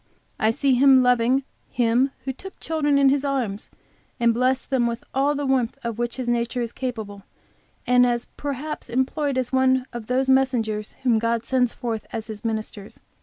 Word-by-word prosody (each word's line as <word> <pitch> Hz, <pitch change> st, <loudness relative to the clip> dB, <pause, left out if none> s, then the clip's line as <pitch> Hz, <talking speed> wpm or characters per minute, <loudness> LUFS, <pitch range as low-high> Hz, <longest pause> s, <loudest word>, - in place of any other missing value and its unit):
I 220 Hz, -, +3 dB
see 270 Hz, +4 st, +2 dB
him 260 Hz, 0 st, +6 dB
loving 250 Hz, +2 st, +3 dB, 0.3 s
Him 245 Hz, +2 st, +2 dB, 0.2 s
who 265 Hz, -, -2 dB
took 385 Hz, +9 st, -11 dB
children 295 Hz, -3 st, +1 dB
in 275 Hz, -1 st, +5 dB
His 280 Hz, 0 st, +1 dB
arms 250 Hz, -8 st, -2 dB, 0.5 s
and 235 Hz, -1 st, +3 dB
blessed 255 Hz, +3 st, 0 dB
them, 250 Hz, -3 st, +2 dB
with 235 Hz, 0 st, -4 dB
all 280 Hz, +2 st, +2 dB
the 285 Hz, 0 st, -2 dB
warmth 265 Hz, -2 st, 0 dB
of 235 Hz, -1 st, -4 dB
which 240 Hz, -1 st, -2 dB
his 255 Hz, -2 st, -4 dB
nature 240 Hz, +1 st, 0 dB
is 235 Hz, -1 st, -2 dB
capable, 220 Hz, -7 st, -5 dB, 0.6 s
and 250 Hz, 0 st, +5 dB
as 240 Hz, -1 st, +1 dB
perhaps 290 Hz, 0 st, -5 dB
employed 260 Hz, +3 st, 0 dB
as 255 Hz, 0 st, -2 dB
one 260 Hz, -1 st, +3 dB
of 235 Hz, -2 st, -7 dB
those 260 Hz, +1 st, +1 dB
messengers 240 Hz, -6 st, +1 dB
whom 235 Hz, -4 st, +3 dB
God 230 Hz, 0 st, -1 dB
sends 250 Hz, -2 st, +2 dB
forth 230 Hz, -3 st, -4 dB
as 225 Hz, -1 st, -4 dB
His 215 Hz, -2 st, -8 dB
ministers. 215 Hz, -2 st, -5 dB
250 Hz, 180 wpm, -23 LUFS, 230-265 Hz, 0.6 s, him